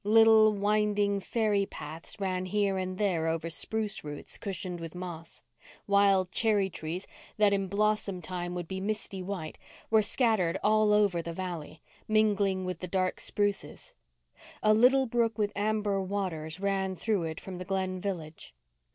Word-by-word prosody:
Little, 220 +1 +6
winding, 205 0 +1
fairy 205 -1 0
paths 155 +7 -8
ran 185 -1 -1
here 200 0 +1
and 185 0 -3
there 180 -6 +1
over 165 +1 -2
spruce 215 +4 -1
roots 145 -1 -7
cushioned 185 -3 -4
with 165 0 -7
moss. 175 -2 -8 0.4
Wild 200 -2 +3
cherry 205 -3 +1
trees, 165 +4 -5 0.3
that 210 -1 +4
in 195 -1 0
blossom 205 -1 0
time 175 +1 -4
would 175 -2 -4
be 190 +2 -4
misty 200 -1 -3
white, 180 -4 -5 0.3
were 220 -1 +6
scattered 205 -5 +1
all 215 0 +4
over 205 -5 +3
the 170 0 -6
valley, 170 -4 -6 0.2
mingling 205 -3 +2
with 180 -2 -4
the 180 - -5
dark 185 0 0
spruces. 205 - -2 0.7
A 215 0 +6
little 255 +4 +5
brook 230 -2 0
with 205 -1 0
amber 205 -1 0
waters 185 -4 -3
ran 195 -1 0
through 200 -2 0
it 160 -1 -5
from 185 -2 -8
the 180 - -6
Glen 190 -1 -2
village. 165 -6 -6
195 Hz, 155 wpm, -29 LUFS, 180-210 Hz, 0.7 s, Little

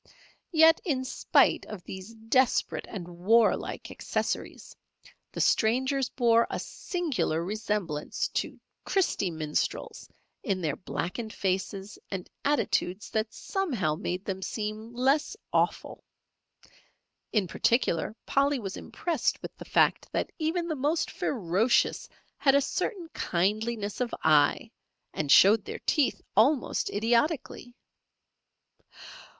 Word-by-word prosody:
Yet, 320 -1 +6
in 265 -8 -1
spite - - +3
of 205 -5 -8
these 190 +4 -9
desperate 225 +3 +1
and 185 -6 -6
warlike 200 +6 +1
accessories, - - -4 0.6
the - - -7
strangers 260 +4 +2
bore 235 -2 +3
a - - -2
singular 295 - -2
resemblance 205 -7 -2
to - - -3 0.2
"Christy 360 - +1
Minstrels" 155 -2 -3 0.3
in 195 -7 -1
their 155 -5 -1
blackened 215 +5 -4
faces 195 +1 -3
and 190 -2 -5 0.2
attitudes 215 -9 0
that 220 0 -1
somehow 260 - -1
made 180 +3 -4
them 190 -1 -3
seem 215 +2 -4
less 275 - +1 0.2
awful. - - 0 1.3
In 205 -4 +1
particular, 215 -1 +1
Polly 280 +1 +2
was 195 -6 -5
impressed 340 -3 -2
with - - -7
the - - -9
fact - - +2
that - - -1
even 335 +2 -1
the 315 - -2
most 300 +4 0
ferocious 215 0 +1 0.3
had 275 -1 +4
a - - +6
certain 350 - -2
kindliness 210 +4 -1
of 245 - -1
eye, 150 -2 +3 0.4
and 145 -2 -1
showed 205 +2 +7
their - - -6
teeth 290 -4 +1 0.2
almost 250 +6 +3
idiotically. 240 +3 0
225 Hz, 115 wpm, -28 LUFS, 190-270 Hz, 1.3 s, showed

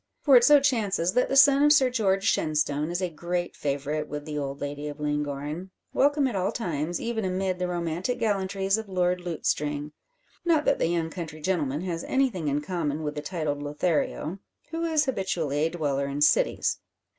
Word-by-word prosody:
For 280 -3 +6
it 240 - +8
so 295 +3 +7
chances 205 -10 +1
that 250 - +2
the 270 - 0
son 280 0 +7
of 295 0 +6
Sir 270 -4 +5
George 195 -5 +1
Shenstone 150 -5 +1
is 175 +2 -2
a 180 - 0
great 175 +2 -3
favourite 145 +2 -2
with 150 0 -6
the 155 -1 -5
old 140 -1 -3
lady 145 +1 -4
of 145 0 -7
Llangorren; 150 +3 -3 0.2
welcome 285 +1 +3
at 245 - -3
all 190 +2 0
times, 170 -7 -2
even 230 -2 -2
amid 185 0 -1
the 180 - -1
romantic 175 +6 -2
gallantries 195 -2 0
of 220 -2 -8
Lord 180 -1 0
Lutestring. 150 -3 -2 0.5
Not 325 -3 +2
that 280 - +2
the - - +2
young 165 -1 -1
country 160 -3 -7
gentleman 155 -4 -1
has 170 -2 -3
anything 250 - 0
in 145 +1 0
common 155 -3 -2
with 150 -1 -2
the 150 - -5
titled 150 -3 -3
Lothario, 155 +3 -1 0.3
who 330 0 -3
is 315 -2 +2
habitually 180 - -1
a 160 +2 +2
dweller 145 -5 -1
in 140 +1 -4
cities. 150 - +2
175 Hz, 190 wpm, -26 LUFS, 150-205 Hz, 0.5 s, it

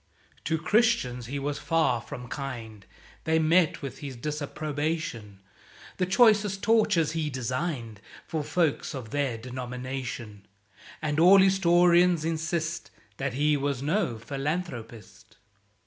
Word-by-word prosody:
To 160 - +1
Christians 180 - +1
he 140 +3 -4
was 145 +1 -3
far 160 -8 +1
from 125 +1 -8
kind, 115 -7 -7 0.4
They 160 0 +2
met 160 0 +3
with 135 - -6
his 140 -4 -7
disapprobation; 145 -6 -4 0.6
The 185 - 0
choicest 205 -1 +4
tortures 210 -8 +3
he 160 -2 -2
designed 125 - -3 0.2
For 155 -2 -3
folks 160 -3 0
of 120 -5 -7
their 140 -5 -1
denomination. 125 -3 -6 0.6
(And 150 0 0
all 180 +4 +8
Historians 175 -3 +4
insist 165 0 -2 0.3
That 135 -2 -2
he 150 +2 +2
was 140 -2 -2
no 160 - 0
philanthropist.) 135 -3 -6
150 Hz, 115 wpm, -27 LUFS, 125-170 Hz, 0.6 s, all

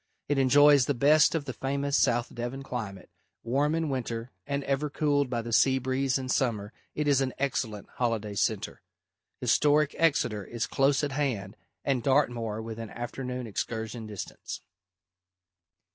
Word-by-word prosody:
It 145 -1 +1
enjoys 140 0 +6
the 145 - +1
best 150 +6 +5
of 155 -3 -1
the 130 - -4
famous 140 +2 -1
South 120 0 +2
Devon 120 +3 -5
climate; 110 -8 -6 0.3
warm 140 +6 +1
in 165 -1 0
winter 120 -3 -3 0.2
and 140 0 -1
ever 140 +2 -1
cooled 145 -2 +1
by 120 -2 -2
the 115 0 -5
sea 130 +3 +5
breeze 130 +1 0
in 130 -1 -5
summer, 115 -5 0 0.2
it 150 -1 -1
is 140 -2 +4
an 130 -1 -1
excellent 115 -6 -2
holiday 115 -4 -1
centre. 100 - -1 0.6
Historic 150 0 +3
Exeter 130 -10 +2
is 120 +3 -3
close 135 +1 +2
at 145 - -1
hand 120 -9 -2 0.3
and 135 -3 +1
Dartmoor 115 -5 +1
within 115 -1 -6
afternoon 125 +2 -5
excursion 110 +1 -4
distance. 105 -3 -7
130 Hz, 150 wpm, -28 LUFS, 115-140 Hz, 0.6 s, enjoys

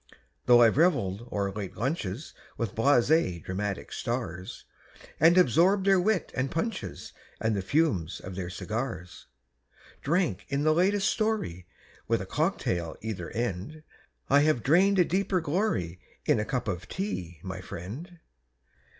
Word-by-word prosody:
Though 120 -1 +8
I've 115 +2 +4
reveled 120 - +2
o'er 100 -1 -1
late 95 -2 -6
lunches 125 - -3 0.2
With 115 -5 -2
blasé 120 - +3
dramatic 100 +1 -4
stars, 95 -7 -4 0.5
And 170 +2 +6
absorbed 180 - +4
their 195 -1 +5
wit 190 -2 +1
and 130 +1 -1
punches 165 - -4 0.3
And 110 -1 0
the 100 - -1
fumes 95 - 0
of 95 - -8
their 90 -1 -4
cigars 110 -1 -5 0.7
Drank 155 - 0
in 140 +1 0
the 155 0 +4
latest 195 +4 +2
story, 215 - -1 0.4
With - - +2
a - - -5
cock - - 0
tail 85 -3 -2
either 100 -6 -4
end, 120 - -4 0.4
I 140 - +5
have 150 -5 +2
drained 190 +7 +4
a 180 - +5
deeper 190 +1 +1
glory 145 - -1 0.3
In - - +3
a - - -1
cup - - -2
of 90 0 -3
tea, 90 - -4
my 95 -1 -5
friend. 115 - -8
120 Hz, 145 wpm, -28 LUFS, -, 0.7 s, Though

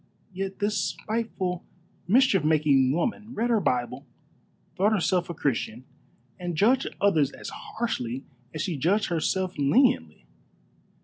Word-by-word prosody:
Yet 195 +1 -4
this 210 0 0
spiteful, 190 -3 -2 0.4
mischief 215 - +4
making 150 -4 +3
woman 215 - -2
read 235 +2 0
her 225 - +4
Bible, 125 - -1 0.7
thought 205 +4 +3
herself 180 -3 +1
a 170 - -4
Christian, 125 -4 -2 0.6
and 175 -2 -4
judged 245 +8 +3
others 160 -9 +3
as - - -8
harshly 135 - -4 0.3
as 155 +1 -3
she 170 -5 -2
judged 195 +9 +1
herself 180 +2 -1
leniently. 140 - +2
180 Hz, 125 wpm, -26 LUFS, 145-210 Hz, 0.7 s, mischief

